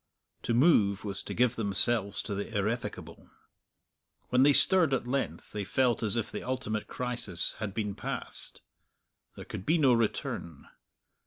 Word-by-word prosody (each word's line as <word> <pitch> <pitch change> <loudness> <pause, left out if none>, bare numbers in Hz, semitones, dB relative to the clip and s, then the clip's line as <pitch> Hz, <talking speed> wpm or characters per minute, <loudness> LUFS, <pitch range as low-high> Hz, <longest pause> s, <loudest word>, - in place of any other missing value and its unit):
To 115 - -1
move 110 - +3
was 100 -1 -4
to - - -7
give 125 0 +2
themselves 100 0 +1
to 105 - -5
the 100 +2 -4
irrevocable. 110 +4 -5 1.0
When 125 0 +2
they 145 +2 +6
stirred 165 -1 +5
at 125 - -4
length 135 +2 -4
they 105 -1 -4
felt 125 +4 0
as 110 -1 +1
if 115 -3 -3
the - - -5
ultimate 125 -5 -4
crisis 120 -8 +2
had 100 -3 -5
been 105 -2 -3
passed; - - -4 0.7
there - - -10
could - - -8
be 160 - +1
no 135 -5 +4
return. 105 - -3
115 Hz, 155 wpm, -29 LUFS, 100-125 Hz, 1.0 s, they